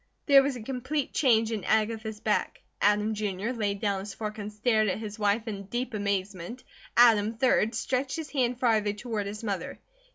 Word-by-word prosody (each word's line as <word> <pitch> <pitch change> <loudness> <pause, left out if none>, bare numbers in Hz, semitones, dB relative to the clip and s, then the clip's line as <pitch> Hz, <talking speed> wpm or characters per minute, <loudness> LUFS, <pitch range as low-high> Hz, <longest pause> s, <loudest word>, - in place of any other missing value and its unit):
There 280 -2 +7
was 275 -1 -1
a 240 - -7
complete 270 +4 -3
change 230 -5 +3
in 215 -4 -3
Agatha's 220 0 0
back. 215 -1 -1 0.2
Adam, 210 +1 +3
Jr., 205 +1 -2
laid 205 -5 -2
down 200 -3 0
his 200 +1 -7
fork 215 0 -5
and 210 0 -5
stared 215 0 +2
at 185 - 0
his 215 -1 -7
wife 210 +2 +1
in 200 -2 -5
deep 240 +4 -3
amazement. 200 +1 -3 0.3
Adam, 225 -2 +5
3d, 225 -2 +2
stretched 260 +3 -1
his 320 -2 -6
hand 250 -3 0
farther 220 -4 +2
toward 215 -1 -4
his 210 +2 -6
mother. 200 -4 -3
220 Hz, 185 wpm, -28 LUFS, 205-240 Hz, 0.3 s, There